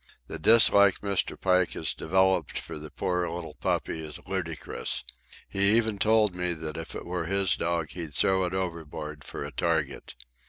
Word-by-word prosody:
The -, -, -7 dB
dislike 100 Hz, 0 st, +6 dB
Mr. 100 Hz, -2 st, -1 dB
Pike 90 Hz, -1 st, +2 dB
has 80 Hz, -, -1 dB
developed 95 Hz, -1 st, +1 dB
for -, -, -7 dB
the 75 Hz, 0 st, -8 dB
poor 90 Hz, +1 st, -1 dB
little 85 Hz, -2 st, -6 dB
puppy 80 Hz, +1 st, -2 dB
is 75 Hz, -1 st, -7 dB
ludicrous. 85 Hz, -5 st, -2 dB, 0.4 s
He 100 Hz, +3 st, +4 dB
even 110 Hz, -3 st, 0 dB
told 110 Hz, -2 st, +3 dB
me 90 Hz, 0 st, -1 dB
that 80 Hz, -1 st, -5 dB
if 80 Hz, 0 st, -7 dB
it -, -, -6 dB
were 90 Hz, -1 st, -3 dB
his 95 Hz, 0 st, +1 dB
dog 85 Hz, -2 st, -2 dB
he'd 80 Hz, -5 st, -6 dB
throw 95 Hz, +4 st, +3 dB
it 90 Hz, -, -4 dB
overboard 80 Hz, -5 st, -5 dB
for -, -, -6 dB
a 70 Hz, -, -7 dB
target. 80 Hz, -4 st, -2 dB
90 Hz, 170 wpm, -27 LUFS, 80-95 Hz, 0.4 s, dislike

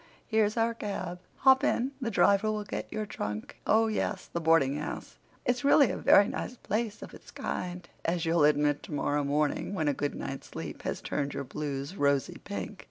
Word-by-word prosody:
Here's 220 Hz, 0 st, +1 dB
our 230 Hz, 0 st, +2 dB
cab. 185 Hz, -5 st, -4 dB, 0.2 s
Hop 265 Hz, 0 st, +5 dB
in—the 260 Hz, 0 st, 0 dB
driver 200 Hz, 0 st, +4 dB
will 210 Hz, -1 st, -2 dB
get 205 Hz, -, -5 dB
your 215 Hz, -, -2 dB
trunk. 105 Hz, -, -5 dB
Oh, 225 Hz, +1 st, +5 dB
yes, 220 Hz, -1 st, -1 dB
the 170 Hz, -, -1 dB
boardinghouse—it's 160 Hz, -, 0 dB
really 280 Hz, -2 st, +6 dB
a -, -, -3 dB
very 200 Hz, -, +6 dB
nice 250 Hz, -, -4 dB
place 220 Hz, +1 st, -2 dB
of -, -, -10 dB
its -, -, -13 dB
kind, 180 Hz, -1 st, -4 dB, 0.2 s
as 170 Hz, 0 st, 0 dB
you'll 165 Hz, -1 st, +3 dB
admit 150 Hz, -1 st, +3 dB
tomorrow 145 Hz, 0 st, -1 dB
morning 150 Hz, +6 st, 0 dB
when 155 Hz, -5 st, 0 dB
a 145 Hz, -, +3 dB
good 145 Hz, +1 st, -2 dB
night's 135 Hz, -, -6 dB
sleep -, -, -7 dB
has -, -, -3 dB
turned 145 Hz, 0 st, -2 dB
your 140 Hz, -, -2 dB
blues 140 Hz, +3 st, -4 dB
rosy 140 Hz, -5 st, +1 dB
pink. -, -, -5 dB
180 Hz, 175 wpm, -29 LUFS, 145-220 Hz, 0.2 s, really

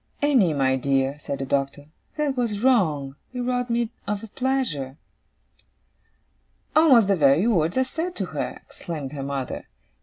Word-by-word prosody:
'Annie, 240 Hz, -, +4 dB
my 130 Hz, -1 st, +2 dB
dear,' 135 Hz, +1 st, 0 dB
said 140 Hz, -1 st, -4 dB
the 135 Hz, -, -4 dB
Doctor. 140 Hz, +1 st, -1 dB, 0.3 s
'That 295 Hz, -3 st, 0 dB
was 230 Hz, -5 st, -1 dB
wrong. 155 Hz, -, +2 dB, 0.2 s
It 250 Hz, -, -3 dB
robbed 245 Hz, 0 st, -1 dB
me 235 Hz, -1 st, 0 dB, 0.2 s
of 205 Hz, 0 st, -2 dB
a -, -, -7 dB
pleasure.' 220 Hz, -, -2 dB, 1.8 s
'Almost 270 Hz, -10 st, +6 dB
the 200 Hz, -, +3 dB
very 145 Hz, +3 st, +4 dB
words 175 Hz, -5 st, +2 dB
I 260 Hz, -, +4 dB
said 330 Hz, +7 st, -4 dB
to -, -, -2 dB
her!' -, -, -3 dB
exclaimed 150 Hz, -6 st, -6 dB
her 145 Hz, -2 st, -6 dB
mother. 135 Hz, -1 st, -4 dB
185 Hz, 155 wpm, -24 LUFS, -, 1.8 s, Almost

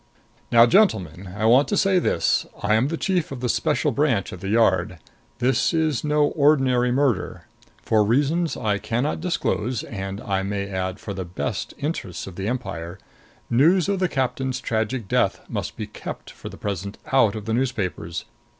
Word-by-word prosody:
Now, 115 Hz, 0 st, +8 dB
gentlemen, 95 Hz, -, +2 dB
I 110 Hz, -, 0 dB
want 125 Hz, +6 st, +5 dB
to 205 Hz, -, 0 dB
say 190 Hz, -1 st, +3 dB
this: -, -, +1 dB, 0.2 s
I 105 Hz, +1 st, +2 dB
am 110 Hz, +5 st, +3 dB
the 165 Hz, +2 st, -3 dB
Chief 180 Hz, -5 st, 0 dB
of 135 Hz, -, -5 dB
the 125 Hz, -, -1 dB
Special -, -, +1 dB
Branch -, -, 0 dB
at -, -, -8 dB
the 95 Hz, -, -5 dB
Yard. 100 Hz, -5 st, +2 dB, 0.4 s
This 125 Hz, +6 st, +1 dB
is 155 Hz, -6 st, +1 dB
no 150 Hz, 0 st, +3 dB
ordinary 135 Hz, -5 st, +3 dB
murder. 120 Hz, -9 st, 0 dB, 0.4 s
For 110 Hz, -2 st, +3 dB
reasons 145 Hz, +9 st, +1 dB
I 105 Hz, -2 st, 0 dB
can 115 Hz, +4 st, -1 dB
not 150 Hz, +2 st, -2 dB
disclose 130 Hz, -, -1 dB
and, 95 Hz, -2 st, -5 dB
I 95 Hz, -1 st, -1 dB
may 100 Hz, 0 st, -3 dB
add, 95 Hz, 0 st, -3 dB
for 100 Hz, -, -6 dB
the 95 Hz, 0 st, -4 dB
best 85 Hz, 0 st, -4 dB
interests 140 Hz, -, -4 dB
of 95 Hz, -, -9 dB
the 95 Hz, +2 st, -4 dB
empire 95 Hz, -8 st, -4 dB, 0.5 s
news 165 Hz, +10 st, +4 dB
of 200 Hz, -1 st, 0 dB
the 185 Hz, -1 st, +1 dB
captain's 130 Hz, -1 st, -1 dB
tragic 110 Hz, 0 st, -2 dB
death -, -, +1 dB
must -, -, -4 dB
be -, -, -3 dB
kept -, -, -8 dB
for -, -, -9 dB
the -, -, -11 dB
present 100 Hz, 0 st, -4 dB, 0.2 s
out 115 Hz, -6 st, +4 dB
of 105 Hz, -1 st, -6 dB
the 110 Hz, -, -1 dB
newspapers. 100 Hz, -9 st, -2 dB
115 Hz, 180 wpm, -23 LUFS, 100-145 Hz, 0.5 s, Now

